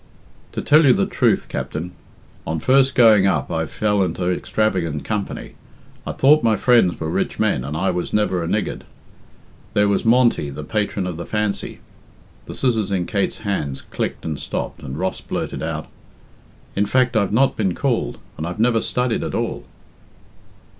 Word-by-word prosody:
"To - - -3
tell 155 +2 +5
you 130 - +7
the 100 - +1
truth, - - +1
Captain, 85 +4 -4 0.6
on 80 0 -1
first 130 - +3
going 110 -6 +6
up 75 -7 0
I 80 -1 -1
fell 105 +2 0
into 90 0 -1
extravagant 90 -6 -1
company. 105 -3 -4 0.5
I - - -1
thought 150 +3 +5
my 110 -2 +3
friends 115 -5 +3
were 80 - -3
rich 80 - -1
men, 65 - +1
and 75 +3 -4
I 95 +3 +1
was 90 -1 -3
never 105 -4 +1
a - - -3
niggard. 105 +4 -2 0.9
There 105 0 +4
was 100 -1 +1
Monty, 115 - +3
the 70 +2 -7
patron 100 +2 -1
of 90 -3 -4
the 85 - -5
Fancy" 105 -2 -2 0.7
the - - -7
scissors 110 -6 0
in 90 -3 0
Kate's 100 +1 -1
hand 75 -10 -3
clicked - - -3
and 75 -3 -3
stopped - - -4
and 65 +2 -6
Ross 95 +3 -2
blurted - - -4
out, - - -3 0.9
"In 100 +1 +1
fact, 125 +2 +2
I've 100 -3 +2
not 130 +6 +3
been 95 -5 0
called, - - -1 0.2
and 80 - -3
I've 85 +5 -6
never 115 0 +3
studied 125 -2 -1
at - - -3
all." - - -3
100 Hz, 175 wpm, -21 LUFS, 85-115 Hz, 0.9 s, you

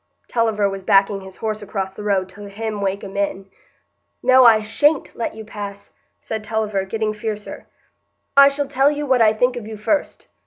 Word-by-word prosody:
(Tulliver 220 -3 +1
was 195 -1 -5
backing 195 +1 +3
his 190 -1 -11
horse 215 -1 -3
across 195 -2 -4
the 200 - -9
road 195 -3 0
to 205 0 -11
hem 215 0 -4
Wakem 195 0 -3
in.) 195 -1 -3 0.7
"No, 260 0 +6
I 220 -2 +7
sha'n't 290 +8 +1
let 230 - -3
you 220 0 -9
pass," 200 -2 -8 0.3
said 220 -1 -5
Tulliver, 215 -2 -1
getting 215 +1 -2
fiercer. 210 -1 -6 0.7
"I 280 0 +9
shall 280 0 -1
tell 275 +1 +3
you 295 0 -3
what 260 -3 +2
I 220 -1 +6
think 245 +3 +1
of 220 -3 -7
you 220 -1 -7
first. 285 +8 -2
215 Hz, 185 wpm, -20 LUFS, 200-230 Hz, 0.7 s, I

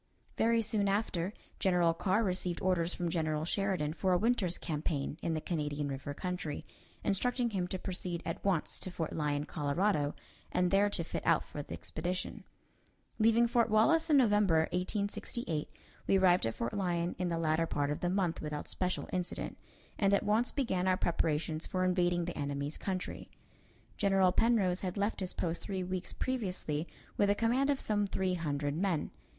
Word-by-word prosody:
Very 230 0 +3
soon 210 -2 +1
after, 195 -3 0 0.3
General 175 -3 +3
Carr 190 +6 +1
received 180 -3 0
orders 180 -2 +1
from 175 -2 -1
General 155 -2 0
Sheridan 185 -5 0
for 185 +2 +1
a - - +5
winter's 210 -4 +1
campaign 150 -1 -2
in 165 - -1
the - - 0
Canadian 150 -4 -2
River 140 +1 -5
country, 180 -4 -4 0.4
instructing 245 +4 +1
him 185 -3 -1
to 185 - -3
proceed 180 -2 -4
at 165 - -4
once 190 -6 +1
to - - -5
Fort 165 -3 -3
Lyon, 150 -1 0
Colorado, 150 +1 0 0.4
and 180 0 +2
there 200 +1 +4
to 180 -4 -1
fit - - -4
out 165 -1 +3
for 145 - -6
the - - -8
expedition. 180 +3 -4 0.8
Leaving 230 +2 +5
Fort 235 -1 +2
Wallace 315 +11 +4
in 295 - +6
November, 205 -9 +4
1868, 195 -2 -2 0.4
we 195 - +5
arrived 180 -8 +4
at 115 - -3
Fort 115 - -3
Lyon 175 -3 0
in 180 -1 0
the 170 - -1
latter 165 0 +1
part 145 -1 0
of 150 - -2
the 175 - 0
month 180 -3 0
without 150 -1 -4
special 185 -1 -2
incident, 180 -1 -2 0.4
and 200 -1 +4
at - - 0
once 220 +4 +3
began 190 -10 0
our 185 0 +3
preparations 160 -2 0
for 185 0 0
invading 175 -1 +2
the 175 - -4
enemy's 140 +1 -3
country. 185 -2 -4 0.7
General 195 -2 +4
Penrose 195 -5 +3
had 185 +1 -3
left 205 +2 0
his 185 -2 -3
post 170 -1 -1
three 190 -3 -3
weeks 185 0 -4
previously 185 - -2 0.3
with 205 - +3
a 205 - +4
command 245 +6 +2
of 280 -2 +2
some 205 -1 +1
three 190 -1 0
hundred 145 -4 -1
men. 180 -2 0
180 Hz, 175 wpm, -33 LUFS, 160-200 Hz, 0.8 s, in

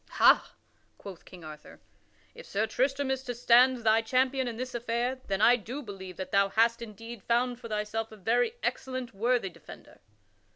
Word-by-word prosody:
"Ha!" - - +5 0.4
quoth 195 -4 -11
King 180 -2 -13
Arthur, 155 -1 -11 0.5
"if 485 - -12
Sir 210 +2 0
Tristram 265 +4 0
is 265 -1 -1
to 250 -2 -5
stand 245 +1 +4
thy 220 0 +4
champion 260 +3 +1
in 230 -2 -5
this 255 +1 -5
affair, 240 +2 -2
then 195 +1 -1
I 245 +3 +6
do 250 +6 -7
believe 190 -5 -9
that 190 - -6
thou 200 0 +3
hast 230 +3 +2
indeed 230 0 -9
found 240 +2 0
for 240 - -8
thyself 215 +1 -3
a 215 - -12
very 240 - +1
excellent, 255 -2 -3
worthy 230 0 0
defender." - - -14
235 Hz, 175 wpm, -29 LUFS, 210-255 Hz, 0.5 s, I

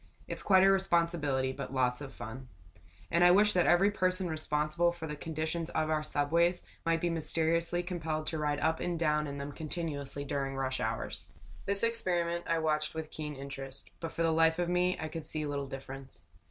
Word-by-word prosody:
"It's - - -4
quite 190 -2 +5
a 195 - +7
responsibility, 170 -8 +2
but 135 0 -6
lots 125 0 +1
of 140 -2 -7
fun." 125 +1 -8 0.6
And 170 +1 +4
I 175 - +8
wished 210 +3 +5
that 180 -1 +3
every 195 +4 +5
person 185 -2 +1
responsible 155 +1 +1
for 170 -2 -7
the 150 -1 -4
condition 160 +2 -3
of 155 0 +1
our 155 -1 +2
subways 165 +4 +1 0.2
might 165 0 +2
be 175 - +1
mysteriously 165 +2 +1
compelled 160 -3 -3
to 160 0 -2
ride 150 -1 0
up 160 - +1
and 175 -1 -1
down 150 -2 +1
in 140 0 -5
them 140 +1 -5
continuously 145 -3 -4
during 135 -1 -2
rush 130 -1 -1
hours. 115 0 -3 0.4
This 200 +1 +1
experiment 175 -7 0
I 165 - +2
watched 155 -1 0
with 160 -1 -5
keen 150 -1 -5
interest, 135 0 -8
but 165 -1 -4
for 165 - -1
the 165 - +3
life 160 0 +4
of 175 -1 0
me 180 +1 +2
I 160 - -3
could 155 -1 -6
see 155 -1 -3
little 140 -1 -3
difference. 135 -5 -8
160 Hz, 195 wpm, -31 LUFS, 145-170 Hz, 0.6 s, I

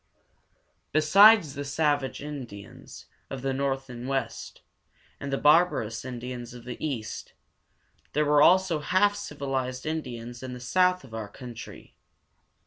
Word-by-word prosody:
Besides 180 +2 +6
the 140 - -5
savage 145 -1 0
Indians 125 -9 -9 0.2
of 135 -2 -6
the 135 -1 0
north 135 0 -1
and 125 0 -7
west, 135 0 -4 0.6
and 140 - -5
the 135 - 0
barbarous 150 -8 +3
Indians 125 -1 -7
of 120 - -11
the 125 +3 -7
east, 120 -8 -4 0.8
there 150 +1 +2
were 145 0 +4
also 185 -1 +5
half 205 +7 +2
civilized 135 -8 -4
Indians 120 -6 -5
in 130 -1 -6
the 125 - -7
south 180 +7 +2
of 125 -4 -14
our 110 -2 -4
country. 120 0 -10
135 Hz, 135 wpm, -27 LUFS, 125-155 Hz, 0.8 s, Besides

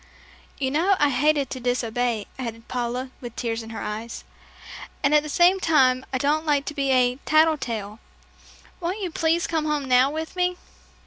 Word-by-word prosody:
"You 265 -1 -1
know 350 +7 +3
I 295 -3 +3
hated 285 0 +1
to 260 - -4
disobey," 245 -2 -1
added 230 -2 -6
Paula, 250 +1 -3
with 240 -2 -8
tears 230 -1 -2
in 225 - -10
her 225 -2 -6
eyes, 220 +2 -6 0.8
"and 280 - +3
at 300 - +6
the 300 - -7
same 355 +5 +4
time, 260 -7 +3
I 260 - 0
don't 295 +4 +1
like 285 -2 +2
to - - -4
be 280 -2 -1
a 250 -1 +3
'tattle 310 +1 +3
tale.' 215 -3 -5 0.8
Won't 365 +5 -3
you 365 -3 -3
please 330 +2 +1
come 320 -2 -1
home 300 -2 -1
now 255 +1 +4
with 315 +3 -5
me?" 360 0 0
270 Hz, 185 wpm, -24 LUFS, 245-310 Hz, 0.8 s, at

